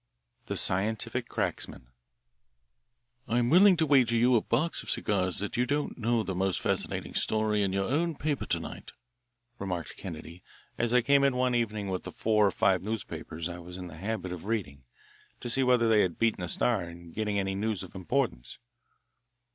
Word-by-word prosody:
The - - -3
Scientific 105 +4 +2
Cracksman - - -3 1.4
"I'm 120 +1 +1
willing 185 +2 +7
to 160 - +2
wager 130 -5 +4
you 120 +2 +4
a 115 - +4
box 155 +9 0
of - - -9
cigars 95 -4 0
that 105 +4 -4
you 125 +1 +1
don't 145 +1 -1
know 115 -1 0
the 95 - -3
most 95 +1 0
fascinating - - -2
story 110 -1 +1
in 100 -2 +1
your 95 0 0
own 160 - 0
paper 145 -1 -2
to - - 0
night," - - -9 0.7
remarked 90 -4 -4
Kennedy, 85 -1 -9 0.3
as 120 0 -1
I 125 0 +5
came 140 +2 +4
in 140 -2 +3
one 125 0 +1
evening 110 -4 -1
with 95 -1 -2
the - - -8
four 105 -2 +2
or - - +1
five 95 0 +2
newspapers 95 -6 -5
I 90 0 -7
was 90 +1 -9
in 90 - -7
the 80 -3 -10
habit 95 0 -4
of 90 0 -7
reading 90 - -3 0.5
to 120 - -3
see 135 - +2
whether 125 -2 +3
they 110 -2 +5
had 90 -3 -1
beaten 115 -4 +1
the 90 - -3
Star 115 +1 +1
in 85 0 -10
getting 105 +1 -2
any 95 -1 -1
news 100 -1 -2
of 95 - -11
importance. 95 - -2
105 Hz, 185 wpm, -29 LUFS, 90-120 Hz, 1.4 s, willing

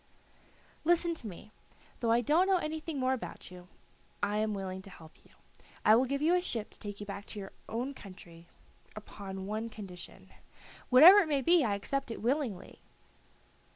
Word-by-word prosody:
"Listen 340 +1 +2
to 260 -9 -7
me; 205 +2 -11 0.5
though 230 -2 +1
I 235 +1 +4
don't 315 - +3
know 385 -1 +4
anything 315 -2 -4
more 260 0 +1
about 245 -6 -7
you, 180 -1 -12 0.6
I 205 +1 +1
am 215 -1 0
willing 190 -1 -5
to 195 - -11
help 160 -4 -14
you. - - -23 0.6
I 215 - +7
will 250 +3 +3
give 280 +3 -2
you 330 +3 +4
a 360 - +3
ship 230 - -4
to - - -20
take 205 -2 -7
you - - -5
back 200 0 -7
to 210 - -7
your 195 -1 -8 0.2
own 245 +5 -3
country 175 -7 -13 0.5
upon 195 -2 -8
one 215 +3 -3
condition." 195 -5 -10 0.6
"Whatever 325 +11 +10
it 375 - +1
may 285 -3 0
be, 340 0 +5
I 210 -4 +1
accept 275 +7 -3
it 230 - -5
willingly." 245 -4 -2
225 Hz, 185 wpm, -31 LUFS, 200-290 Hz, 0.6 s, Whatever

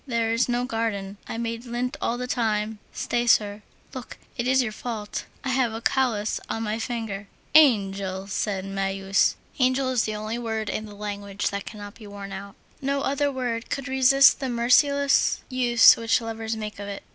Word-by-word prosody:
There 230 -2 0
is 230 +2 +1
no 245 +1 0
garden. 215 -5 -3
I - - -5
made 230 0 -3
lint 245 +1 -3
all 240 - 0
the 250 - -3
time; 220 -3 -1
stay, 240 0 -1
sir, 210 -2 +3 0.3
look, 255 -3 -8 0.2
it 240 -1 -2
is 260 0 +4
your 220 - -3
fault, 215 -1 -5 0.2
I 265 - -2
have 255 -3 +1
a 225 - -4
callous 230 -4 0
on 225 - -2
my 215 +1 -2
fingers." 225 -4 -4 0.3
"Angel!" 195 -9 +4
said 195 -1 -2
Marius. 195 0 +1 0.2
Angel 255 +1 +2
is 250 -3 +1
the 215 - -3
only 215 +2 -4
word 220 -2 -3
in 215 - -4
the 205 - -11
language 200 -1 -3
which 200 0 -4
cannot 205 -2 -8
be 215 -2 -13
worn 200 -1 -8
out. 195 +1 -8 0.3
No 275 0 0
other 280 +1 0
word 245 -3 -3
could 275 0 -3
resist 265 +1 +5
the 265 -2 -2
merciless 275 +4 +3
use 245 -3 +6
which 230 +1 +1
lovers 225 -1 -4
make 210 -1 -6
of 200 - -6
it. 200 -1 -6
225 Hz, 185 wpm, -25 LUFS, 205-250 Hz, 0.3 s, use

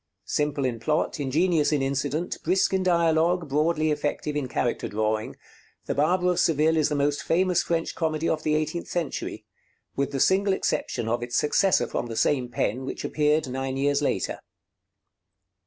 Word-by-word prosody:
Simple 145 -2 -1
in 120 -3 -2
plot, 150 +6 -1
ingenious 155 +3 +2
in 145 -3 +1
incident, 140 +5 -2
brisk 190 +1 +1
in 190 - +2
dialogue, 170 -1 +2
broadly 155 +2 +1
effective 150 0 -2
in 145 -3 -1
character 120 -1 -1
drawing, 110 +1 -2 0.5
'The - - -1
Barber 180 +5 +2
of 180 - -1
Seville' 160 +1 +3
is 155 -1 +2
the 150 - -1
most 145 0 0
famous 180 +1 +2
French 165 -1 -1
comedy 160 -1 -1
of 155 - 0
the 155 0 +1
eighteenth 155 +2 -2
century, 170 -4 -4 0.5
with 140 0 0
the 135 - -2
single 195 +5 +3
exception 115 - -2
of 120 +1 0
its 120 0 -4
successor 185 +5 +3
from - - -3
the 115 -1 -6
same 130 -4 +1
pen, 120 +1 -1
which 130 - -5
appeared 150 -1 +1
nine 135 +1 -3
years 145 +1 +1
later. - - -1
150 Hz, 170 wpm, -25 LUFS, 135-165 Hz, 0.5 s, Seville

